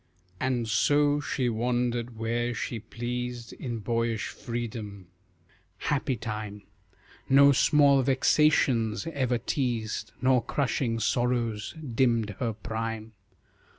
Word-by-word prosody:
And 125 -3 0
so 145 +7 +3
she 130 -3 -1
wandered 120 0 -1
where 120 +2 -1
she 115 +1 -3
pleased 120 +1 -5
In 120 -3 -5
boyish 115 +1 -1
freedom. 110 -5 -6 0.7
Happy 140 -2 -1
time! 105 -2 -6 0.7
No 140 +1 +7
small 140 0 +5
vexations 130 -3 +2
ever 130 -3 +1
teased, 115 -5 -2
Nor 125 0 +3
crushing 125 -3 -1
sorrows 115 -2 0 0.2
dimmed 115 -3 +2
her 115 -3 -1
prime. 110 0 -4
120 Hz, 100 wpm, -28 LUFS, 115-130 Hz, 0.7 s, No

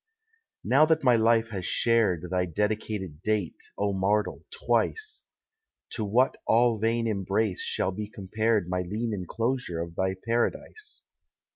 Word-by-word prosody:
Now 145 +5 +5
that 160 -1 +2
my 125 -2 +5
life 115 0 +3
has 95 -4 -5
shared 95 -5 +1
Thy 90 -1 +1
dedicated 105 -3 -2
date, 105 -4 -1 0.2
O 100 0 0
mortal, 95 0 0
twice, 440 -2 -1 0.7
To 110 - -2
what 120 +6 +2
all 115 -1 +4
vain 115 +2 +1
embrace 100 -1 0
shall 95 - -1
be 105 +2 -5
compared 110 -1 0
My 90 0 -1
lean 110 +5 -3
enclosure 110 0 -2
of 85 0 -4
thy 95 +1 0
paradise? 120 - -2
110 Hz, 135 wpm, -27 LUFS, 95-115 Hz, 0.7 s, Now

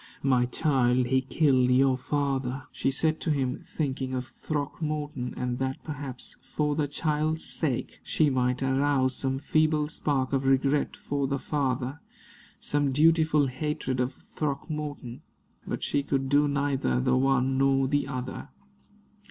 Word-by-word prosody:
"My 125 -3 +3
child, 125 -3 +2
he 130 +2 +2
killed 130 -1 +2
your 130 +1 +4
father," 135 -1 -1
she - - -1
said 155 +3 +1
to - - -2
him, 135 -4 0
thinking 130 -3 -3
of 125 0 -2
Throckmorton, 145 0 -4
and 125 -1 -2
that 130 0 -3
perhaps, 140 -4 -6
for 150 -1 -1
the 150 -1 0
child's 155 +2 -1
sake, 140 -7 -2
she 155 - +2
might 125 0 +1
arouse 135 -1 +2
some 135 -1 -1
feeble 155 +1 +2
spark 140 -4 0
of 135 -1 +1
regret 135 +2 +2
for 140 -1 -2
the 140 +1 -1
father 135 0 -2 0.6
some 145 -1 0
dutiful 155 0 +4
hatred 130 -1 -2
of 125 +1 0
Throckmorton. 145 -3 -5 0.5
But - - -3
she 145 - +1
could 135 -1 -1
do 145 +1 +4
neither 140 - 0
the 65 - +2
one 135 0 +2
nor 135 0 +3
the 145 +1 0
other. 130 -1 -5
135 Hz, 145 wpm, -27 LUFS, 130-150 Hz, 0.6 s, your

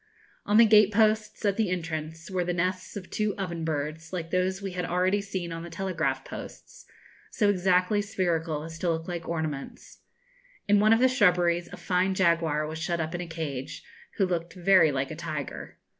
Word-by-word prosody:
On 210 - +4
the 230 - +9
gate 210 -2 +6
posts, 215 0 +1
at 200 -1 +1
the 220 -4 +1
entrance, 160 -1 -4
were 185 -1 0
the 175 0 -2
nests 185 +3 -2
of 185 -2 -9
two 215 -1 -1
oven 170 -4 -4
birds, 155 +1 -3
like 165 -3 -4
those 185 +1 0
we 195 -1 -5
had 180 0 -3
already 185 +3 +1
seen 190 -4 -5
on 165 0 -5
the 170 - -8
telegraph 160 -7 -2
posts, - - -10 0.4
so 205 -2 +2
exactly 185 +2 +2
spherical 170 -6 -1
as 165 0 -8
to 175 - 0
look 165 0 -2
like 170 -2 -5
ornaments. 155 -4 -5 0.7
In 205 0 +5
one 215 +1 +4
of 225 +1 +5
the 260 - +6
shrubberies 175 -8 +2
a - - -8
fine 185 +1 0
jaguar 165 -4 +2
was 155 +1 -5
shut 170 +1 -1
up 160 +1 -3
in 175 - -3
a 175 - -6
cage, 155 -6 -5 0.3
who 195 - +3
looked 170 -2 -3
very 180 -3 +5
like 135 0 -2
a - - -5
tiger. 155 -4 -6
175 Hz, 195 wpm, -27 LUFS, 160-195 Hz, 0.7 s, the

